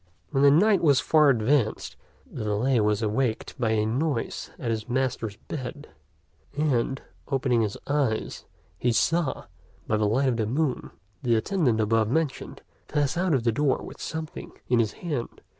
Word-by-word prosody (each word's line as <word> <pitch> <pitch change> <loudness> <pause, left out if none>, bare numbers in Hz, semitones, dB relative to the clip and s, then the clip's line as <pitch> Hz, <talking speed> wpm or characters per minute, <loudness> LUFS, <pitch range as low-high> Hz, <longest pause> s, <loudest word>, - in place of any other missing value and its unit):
When 135 -2 +1
the 140 - +7
night 195 +8 +4
was 145 -5 +4
far 155 -2 +4
advanced, 120 -1 +1 0.3
the - - -7
valet 110 +5 +1
was 105 0 +1
awaked 110 +2 -1
by 115 -3 +1
a 105 -1 +1
noise 125 +2 -2
at 115 - -3
his 110 +1 -3
master's 120 -4 -1
bed: 145 +1 -7 0.7
and, 135 -3 +1 0.3
opening 130 -4 +1
his 105 -2 -2
eyes, 140 -6 -1 0.3
he 120 - +2
saw, 160 +6 +1 0.4
by 110 - 0
the 105 -1 +1
light 130 +6 +2
of 120 - 0
the 110 -2 0
moon, 135 +2 -1 0.3
the 120 -2 +2
attendant 125 - +1
above 110 0 +2
mentioned 150 0 -2 0.2
pass 145 0 0
out 175 -3 +1
of 125 - 0
the 115 - +2
door 140 +3 +1
with - - -10
something 160 -1 -6
in 120 -1 +3
his 110 -2 +1
hand. 145 -9 -5
125 Hz, 165 wpm, -26 LUFS, 110-145 Hz, 0.7 s, the